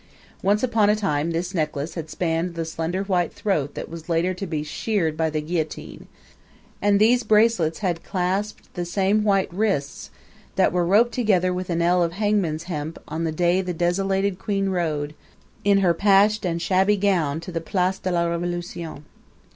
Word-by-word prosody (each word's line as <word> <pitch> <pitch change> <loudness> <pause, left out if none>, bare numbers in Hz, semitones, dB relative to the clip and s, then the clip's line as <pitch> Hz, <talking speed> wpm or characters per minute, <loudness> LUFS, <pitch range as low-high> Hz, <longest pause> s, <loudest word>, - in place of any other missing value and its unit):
Once 205 +3 +2
on 225 -4 +3
a 210 - +4
time 165 -7 0
this 170 +3 -2
necklace 155 -2 -2
had 160 -2 -6
spanned 170 +1 -1
the 165 -1 -2
slender 165 +4 -2
white 180 -3 0
throat 155 -9 -1
that - - -5
was 165 0 -10
later 170 +2 +1
to 190 +2 -5
be 155 -3 -2
sheared 165 0 -1
by 160 0 0
the 155 0 -2
guillotine, 160 0 -4 0.7
and 205 0 +4
these 240 +3 +5
bracelets 210 -7 +3
had 170 -2 -1
clasped 195 +2 -2
the 175 - -3
same 195 +4 +1
white 195 -4 +1
wrists 190 -8 -1 0.5
that - - +3
were 175 -1 +1
roped 220 +6 +4
together 190 -7 +2
with 180 0 -4
an 170 -1 0
ell 175 +1 +3
of 170 -1 0
hangman's 195 -6 0
hemp 160 -2 -5
on 160 +2 -3
the 160 - -1
day 175 +3 +2
the 180 -2 -4
desolated 195 +2 0
queen 195 -1 -1
rode, 155 -5 -1 0.5
in 200 -1 +4
her 175 -3 +4
patched 205 +3 +3
and 170 -1 -1
shabby 190 +3 +3
gown, 175 -7 +1
to 165 +2 -8
the 165 -1 -3
Place 185 +2 0
de 185 - -3
la 170 -1 +1
Revolution. 170 -2 -4
180 Hz, 180 wpm, -23 LUFS, 165-195 Hz, 0.7 s, these